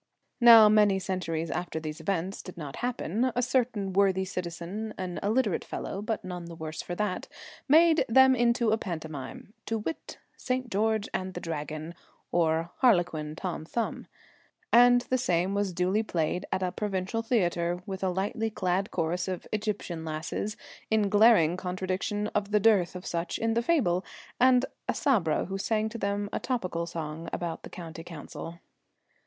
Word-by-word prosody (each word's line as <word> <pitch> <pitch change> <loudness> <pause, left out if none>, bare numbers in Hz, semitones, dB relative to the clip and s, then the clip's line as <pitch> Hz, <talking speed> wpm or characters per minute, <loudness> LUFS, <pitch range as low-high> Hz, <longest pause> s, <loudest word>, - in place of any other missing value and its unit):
Now 230 -3 +9
many 210 -2 +5
centuries 175 -4 -2
after 175 -2 -3
these 155 0 -6
events 185 +2 -2
did 185 - -10
not 145 -4 -7
happen, 245 0 -1
a 245 - +1
certain 240 -6 0
worthy 190 -1 +3
citizen, 180 +4 -5
an 180 -2 -4
illiterate 215 0 +1
fellow, 195 - -5
but 215 -1 -3
none 180 -1 -6
the 170 0 -9
worse 155 -1 -5
for 175 - -5
that, 210 -1 -2 0.4
made 320 +2 +6
them 265 +2 +6
into 235 -1 +2
a 220 - +2
pantomime 160 +1 -6
to 225 - 0
wit, 220 +9 -5 0.2
St. 255 -1 -3
George 215 +1 +1
and 185 0 -3
the - - -3
Dragon; 155 0 -5 0.4
or, 165 0 +1
Harlequin 170 - +2
Tom 175 -2 -4
Thumb. 230 +8 -3 0.7
And 245 +1 +7
the 255 +1 -1
same 180 -4 +1
was 200 -1 0
duly 180 +4 +1
played 175 -4 -2
at 185 - 0
a 180 - 0
provincial 195 +2 -2
theatre, 175 -7 0
with 190 -1 -5
a 190 - +2
lightly 200 +4 -1
clad 195 -2 -1
chorus 175 +1 -1
of 185 -2 -4
Egyptian 205 -6 -3
lasses, 160 +6 -4 0.3
in 215 -2 +2
glaring 205 -6 +5
contradiction 185 +3 -2
of 205 -1 0
the 210 0 +3
dearth 200 -5 +3
of 180 - -7
such 170 0 -2
in 225 0 0
the 235 - +2
fable, 235 - +2 0.4
and 250 0 +5 0.2
a - - +1
Sabra 195 - +2
who 195 +2 -4
sang 220 +1 0
to 230 +1 -7
them 200 0 -1
a - - 0
topical 185 -9 -2
song 165 -1 -5
about 170 -2 -4
the - - -10
County 165 -2 -8
Council. 165 0 -8
190 Hz, 165 wpm, -28 LUFS, 170-220 Hz, 0.7 s, Now